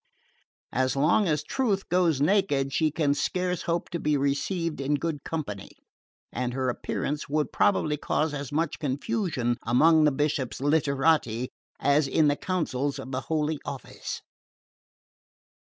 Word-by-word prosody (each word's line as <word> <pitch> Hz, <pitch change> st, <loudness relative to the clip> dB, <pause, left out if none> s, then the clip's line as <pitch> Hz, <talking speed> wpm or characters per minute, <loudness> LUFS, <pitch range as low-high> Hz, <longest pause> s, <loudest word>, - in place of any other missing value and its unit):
As 130 Hz, +1 st, +1 dB
long 165 Hz, +9 st, +3 dB
as 150 Hz, -2 st, +1 dB
Truth 200 Hz, -, -1 dB
goes 170 Hz, -5 st, +2 dB
naked 145 Hz, -5 st, +2 dB
she 155 Hz, +1 st, +2 dB
can 150 Hz, -2 st, +1 dB
scarce 180 Hz, +3 st, -1 dB
hope 170 Hz, 0 st, -1 dB
to 170 Hz, -, -2 dB
be 150 Hz, -1 st, +1 dB
received 145 Hz, +4 st, -1 dB
in 140 Hz, +2 st, +1 dB
good 150 Hz, -1 st, -3 dB
company; 120 Hz, -12 st, -5 dB, 0.6 s
and 125 Hz, 0 st, -2 dB
her 130 Hz, -1 st, 0 dB
appearance 145 Hz, +4 st, -3 dB
would 150 Hz, +1 st, 0 dB
probably 155 Hz, -7 st, +2 dB
cause 150 Hz, +1 st, 0 dB
as 140 Hz, -2 st, -5 dB
much 155 Hz, +1 st, -1 dB
confusion 145 Hz, -, -1 dB
among 155 Hz, +7 st, +5 dB
the 150 Hz, -, +4 dB
Bishop's 140 Hz, -2 st, -1 dB
literati 140 Hz, -4 st, +2 dB, 0.3 s
as 145 Hz, 0 st, +3 dB
in 150 Hz, +2 st, +3 dB
the 145 Hz, -, +2 dB
councils 145 Hz, -6 st, -2 dB
of 135 Hz, -1 st, -7 dB
the 130 Hz, 0 st, -2 dB
Holy 155 Hz, -1 st, -1 dB
Office." 135 Hz, -, -6 dB
150 Hz, 140 wpm, -27 LUFS, 135-165 Hz, 0.6 s, among